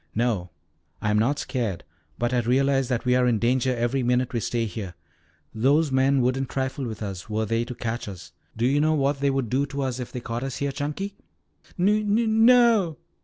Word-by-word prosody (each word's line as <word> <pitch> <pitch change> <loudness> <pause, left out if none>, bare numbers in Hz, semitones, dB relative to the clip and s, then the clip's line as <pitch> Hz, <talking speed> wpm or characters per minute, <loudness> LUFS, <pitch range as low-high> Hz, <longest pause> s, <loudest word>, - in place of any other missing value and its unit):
"No, 110 -6 0 0.5
I 105 - 0
am 105 - +3
not 135 +7 +1
scared, 115 - -3 0.3
but 120 +1 -1
I 125 - +3
realize 135 +2 +2
that 125 -1 -2
we 125 0 +3
are 125 0 +3
in 120 -2 +2
danger 125 +3 +1
every 120 +3 0
minute 125 +1 +1
we 120 - 0
stay 115 +1 -1
here. 100 -5 -6 0.6
Those 140 +7 +2
men 130 +1 +3
wouldn't 130 +1 0
trifle 135 0 -2
with 110 -1 -6
us, 95 -1 -6
were 110 +1 -1
they 115 +2 0
to 125 - -7
catch 115 0 -4
us. 95 -4 -9 0.3
Do 115 - +1
you 140 +3 +3
know 155 +1 +3
what 140 -1 +1
they 140 0 +2
would 135 -5 -1
do 140 +3 +1
to 140 0 -3
us 130 -1 -2
if 125 - -6
they 125 - -5
caught 115 0 -4
us 135 -1 -4
here, 140 0 -1
Chunky?" 150 +8 -4 0.6
"Nu 210 +4 +2
nu 210 +3 +2
no." 225 -6 +4
130 Hz, 215 wpm, -25 LUFS, 115-140 Hz, 0.6 s, no